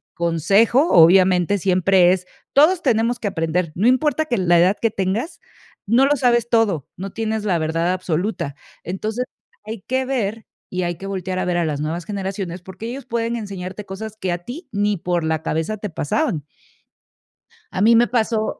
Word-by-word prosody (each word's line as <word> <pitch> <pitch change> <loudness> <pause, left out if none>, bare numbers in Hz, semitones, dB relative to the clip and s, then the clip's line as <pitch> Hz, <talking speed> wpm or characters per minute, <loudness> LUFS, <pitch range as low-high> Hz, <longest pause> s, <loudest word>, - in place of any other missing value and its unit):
consejo, 200 - +3
obviamente, 180 +2 +5
siempre 185 0 +4
es, 185 -1 -4 0.3
todos 325 +5 +5
tenemos 235 -3 +1
que 205 - -2
aprender, 165 -1 -1
no 205 +7 +2
importa 300 +5 +2
que 245 -7 -1
la 175 -2 +3
edad 185 +4 +4
que 230 -2 +2
tengas, 205 - -2 0.5
no 240 +6 +4
lo 290 0 +2
sabes 240 -1 +2
todo, 200 - +1
no 195 +1 -6
tienes 220 -1 -2
la 185 -4 +2
verdad 165 +3 0
absoluta. 175 -4 -2 0.3
Entonces, 215 +7 -3 0.4
hay 215 -2 -6
que 260 +1 0
ver 225 -5 -2 0.2
y 185 0 -2
hay 175 0 -2
que 195 +4 -8
voltear 190 -1 -3
a - - -1
ver 180 -1 0
a 175 - +1
las 150 -2 -2
nuevas 165 +3 -3
generaciones, 190 -3 -4
porque 190 +5 -8
ellos 265 +2 -7
pueden 235 -1 -2
enseñarte 195 -1 -6
cosas 215 +3 -7
que 185 -3 -1
a 175 - -3
ti 265 - -9
ni 205 -1 +1
por 175 -1 -1
la 160 -1 -1
cabeza 160 +7 -2
te 210 0 -5
pasaban. 160 - -1 1.3
A - - -2
mí 230 +2 +6
me 240 +1 +5
pasó 225 -2 -1
195 Hz, 180 wpm, -21 LUFS, 175-230 Hz, 1.3 s, mí